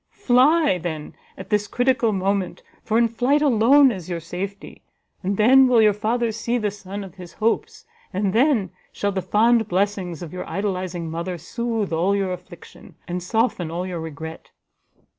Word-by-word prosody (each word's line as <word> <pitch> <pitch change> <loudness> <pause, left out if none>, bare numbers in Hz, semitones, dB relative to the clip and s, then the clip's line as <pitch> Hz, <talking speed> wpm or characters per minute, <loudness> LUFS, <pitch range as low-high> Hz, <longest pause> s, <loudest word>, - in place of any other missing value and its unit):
Fly, 275 - +3
then, 160 -3 -5 0.2
at - - -10
this 210 -1 +1
critical 245 -1 +1
moment, 195 -1 -1 0.2
for 220 - 0
in 235 0 +4
flight 255 +6 +1
alone 265 +1 +5
is 185 -5 -7
your 170 -1 -2
safety; 185 +5 -7 0.4
and 195 +1 -2
then 260 +5 +6
will 245 -2 +4
your 215 -2 +5
father 230 +3 -1
see 230 +2 -2
the 210 -3 -1
son 200 0 -7
of 190 -3 -10
his 180 -2 -11
hopes, 225 - -2 0.3
and 195 0 -1
then 230 - +2 0.2
shall 205 - -2
the 190 -1 -2
fond 220 +4 +3
blessings 185 -3 -1
of 165 - -9
your 180 - -6
idolizing 185 -4 -3
mother 170 +2 -4
soothe 220 +3 -3
all 180 +5 +2
your 195 -2 -1
affliction, 180 -1 -13
and 180 +1 -3
soften 205 -3 0
all 175 +2 -3
your 180 -2 -4
regret!" 160 0 -8
200 Hz, 170 wpm, -22 LUFS, 180-230 Hz, 0.4 s, then